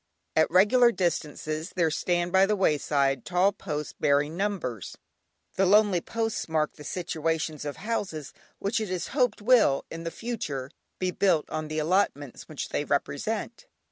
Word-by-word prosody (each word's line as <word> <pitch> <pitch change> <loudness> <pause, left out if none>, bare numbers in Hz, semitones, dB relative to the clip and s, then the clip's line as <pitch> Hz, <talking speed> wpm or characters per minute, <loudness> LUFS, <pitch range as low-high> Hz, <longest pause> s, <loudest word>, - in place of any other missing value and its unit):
At 160 - +4
regular 225 +7 +5
distances 155 -3 -2
there 170 -3 +2
stand 175 +2 0
by 190 +1 +5
the 210 - +2
wayside 140 - +1
tall 180 +2 +2
posts 150 -7 -5
bearing 145 +2 +1
numbers. 175 - -3 0.6
The 195 - +4
lonely 205 -2 +4
posts 225 -3 -3
mark 155 -1 0
the 150 - -12
situations 160 -2 -2
of 145 - -4
houses 190 -9 -4 0.2
which 205 +3 -1
it 215 - -3
is 185 -2 -3
hoped 245 -7 +1
will, 225 - +4
in 165 0 -6
the 165 - -2
future, 165 - -5 0.3
be 185 -1 -1
built 180 -5 +2
on 155 0 -3
the 155 0 -4
allotments 155 -5 0
which 155 - -5
they - - -1
represent. 150 - -2
170 Hz, 155 wpm, -27 LUFS, 150-200 Hz, 0.6 s, regular